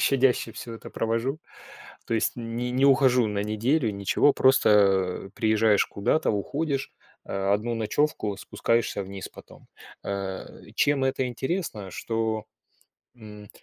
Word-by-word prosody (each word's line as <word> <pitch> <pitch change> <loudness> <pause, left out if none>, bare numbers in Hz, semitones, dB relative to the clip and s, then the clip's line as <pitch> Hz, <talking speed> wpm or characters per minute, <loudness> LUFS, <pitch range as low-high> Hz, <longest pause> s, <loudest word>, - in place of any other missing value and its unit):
щадяще 130 -4 +2
всё 115 -1 -8
это - - -10
провожу. 115 +6 -1 0.7
То 115 - -1
есть 110 - +1
не 120 +1 -4
не 130 +2 +2
ухожу 130 -3 +4
на 100 -1 -2
неделю, 115 +4 +1
ничего. 100 +8 +2
Просто, 130 -4 +4 0.6
а, - - -22
приезжаешь 110 -2 +3
куда-то, 130 +10 0
уходишь, 140 +7 -2 0.3
а, 95 0 -1
1 115 +3 -2
ночевку, 110 -2 -1
спускаешься 115 0 -1
вниз 95 0 -7
потом. - - -16 0.4
Э, 95 -1 -4 0.3
чем 140 -2 +2
это 130 -1 0
интересно, 125 - -3
что, 110 0 -2 0.7
м, 105 -3 -12
115 Hz, 130 wpm, -26 LUFS, 105-130 Hz, 0.7 s, ухожу